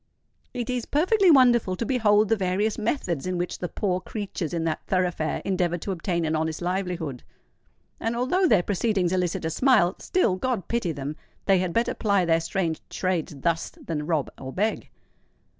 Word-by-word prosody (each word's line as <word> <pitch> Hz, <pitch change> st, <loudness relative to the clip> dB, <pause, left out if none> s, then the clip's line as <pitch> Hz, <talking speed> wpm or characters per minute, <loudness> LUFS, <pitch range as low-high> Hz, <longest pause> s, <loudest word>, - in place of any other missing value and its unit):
It 240 Hz, -2 st, -4 dB
is 250 Hz, -2 st, -2 dB
perfectly 370 Hz, +6 st, +3 dB
wonderful 240 Hz, -, +5 dB
to 230 Hz, -, -3 dB
behold 215 Hz, -4 st, +3 dB
the 225 Hz, -, +4 dB
various 195 Hz, +3 st, 0 dB
methods 185 Hz, -, -1 dB
in 185 Hz, -1 st, -1 dB
which 175 Hz, 0 st, -3 dB
the 180 Hz, -, -3 dB
poor 185 Hz, -3 st, -1 dB
creatures 200 Hz, -7 st, -4 dB
in 170 Hz, -1 st, -1 dB
that 160 Hz, -1 st, -1 dB
thoroughfare 180 Hz, -4 st, 0 dB
endeavour 180 Hz, -2 st, 0 dB
to 195 Hz, -, -4 dB
obtain 170 Hz, -2 st, -1 dB
an 155 Hz, 0 st, 0 dB
honest 160 Hz, 0 st, -1 dB
livelihood; 180 Hz, -7 st, -3 dB, 0.8 s
and 225 Hz, +1 st, -1 dB
although 310 Hz, +11 st, +2 dB
their 205 Hz, -, +4 dB
proceedings 195 Hz, -2 st, 0 dB
elicit 180 Hz, -3 st, -1 dB
a 160 Hz, -, -1 dB
smile—still, 200 Hz, -, +2 dB
God 230 Hz, -3 st, -2 dB
pity 235 Hz, -7 st, -1 dB
them! 145 Hz, +1 st, -5 dB, 0.3 s
they 195 Hz, -2 st, +4 dB
had 180 Hz, -1 st, -1 dB
better 230 Hz, +6 st, +1 dB
ply 200 Hz, -4 st, +1 dB
their 165 Hz, 0 st, +3 dB
strange 165 Hz, -1 st, -2 dB
trades 180 Hz, -5 st, -2 dB
thus 165 Hz, +1 st, 0 dB, 0.2 s
than 150 Hz, -2 st, -3 dB
rob 155 Hz, -5 st, 0 dB
or 130 Hz, 0 st, -6 dB
beg! 210 Hz, +9 st, -1 dB
185 Hz, 175 wpm, -25 LUFS, 170-225 Hz, 0.8 s, wonderful